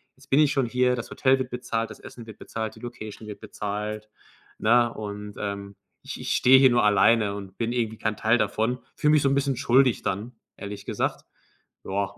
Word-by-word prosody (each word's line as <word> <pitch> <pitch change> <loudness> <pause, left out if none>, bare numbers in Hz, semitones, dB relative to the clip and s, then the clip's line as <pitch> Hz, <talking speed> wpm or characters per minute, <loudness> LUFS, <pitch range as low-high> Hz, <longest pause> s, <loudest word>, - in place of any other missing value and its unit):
jetzt 135 - -21
bin 135 - +5
ich 150 -2 +4
schon 135 -3 +1
hier. 125 +1 +2
Das 120 - -7
Hotel 135 0 +3
wird 130 - -4
bezahlt. 115 -2 -3
Das - - -11
Essen 120 - -11
wird 110 -2 -12
bezahlt. 110 -1 -5
Die - - -14
Location 110 -3 -8
wird 105 - -8
bezahlt, 105 +1 -5 0.5
ne? 120 +1 +3
Und, 105 -1 -7
ähm, 100 -1 -5 0.3
ich - - -8
ich - - -4
stehe 130 +1 +7
hier 135 -1 +7
nur 120 0 +3
alleine 105 0 +4
und 100 -2 -9
bin 115 0 -1
irgendwie 115 -2 -2
kein 110 -1 -2
Teil 115 +2 +3
davon.“ 110 +4 0 0.2
Fühle 150 -2 +2
mich 155 -1 +5
so 140 - +2
'n 135 - +2
bisschen 140 -1 +1
schuldig 125 -1 +3
dann, 105 +5 -3 0.3
ehrlich 100 -1 -7
gesagt, - - -2 0.6
ja. 100 +1 -2
115 Hz, 205 wpm, -25 LUFS, 105-125 Hz, 0.6 s, stehe